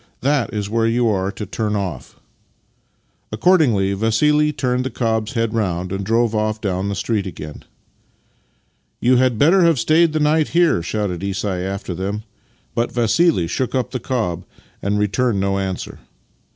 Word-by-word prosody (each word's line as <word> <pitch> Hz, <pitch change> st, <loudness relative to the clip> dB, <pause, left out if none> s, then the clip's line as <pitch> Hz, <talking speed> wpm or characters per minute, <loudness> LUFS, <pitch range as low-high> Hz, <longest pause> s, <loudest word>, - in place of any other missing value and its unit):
That 140 Hz, -2 st, +1 dB
is 105 Hz, -2 st, -3 dB
where 115 Hz, +1 st, +1 dB
j'ou 120 Hz, +1 st, +1 dB
are 95 Hz, 0 st, -1 dB
to 105 Hz, -, -6 dB
turn 105 Hz, +2 st, -2 dB
off." 95 Hz, -9 st, -5 dB, 1.1 s
Accordingly 120 Hz, -, +3 dB
Vassili 150 Hz, +9 st, +2 dB
turned 125 Hz, -3 st, -1 dB
the 130 Hz, -, -2 dB
cob's 110 Hz, -1 st, -1 dB
head 115 Hz, -2 st, -1 dB
round, 90 Hz, -5 st, -1 dB
ajad 100 Hz, 0 st, -3 dB
drove 115 Hz, +1 st, +2 dB
off 110 Hz, 0 st, -1 dB
down 100 Hz, -1 st, -2 dB
the 100 Hz, -, -2 dB
street 100 Hz, 0 st, -1 dB
again. 75 Hz, -4 st, -8 dB, 0.7 s
" -, -, -42 dB, 0.3 s
You 125 Hz, +1 st, +3 dB
had 125 Hz, -2 st, +2 dB
better 175 Hz, -, +5 dB
have 165 Hz, -3 st, +4 dB
stayed 155 Hz, +7 st, +3 dB
the 155 Hz, -, 0 dB
night 150 Hz, +1 st, +2 dB
here," 170 Hz, -, +4 dB
shouted 95 Hz, -1 st, -3 dB
Isai 100 Hz, -1 st, -2 dB
after 95 Hz, -1 st, -4 dB
them, 100 Hz, +4 st, -4 dB, 0.5 s
but 115 Hz, -, -1 dB
Vassili 120 Hz, -, +2 dB
shook 125 Hz, +10 st, -2 dB
up 130 Hz, -2 st, -1 dB
the 130 Hz, -, -3 dB
cob 110 Hz, -9 st, -2 dB, 0.4 s
and 100 Hz, +1 st, 0 dB
returned 105 Hz, +2 st, +1 dB
no 100 Hz, 0 st, 0 dB
answer. 95 Hz, -1 st, -4 dB
110 Hz, 165 wpm, -20 LUFS, 100-130 Hz, 1.1 s, better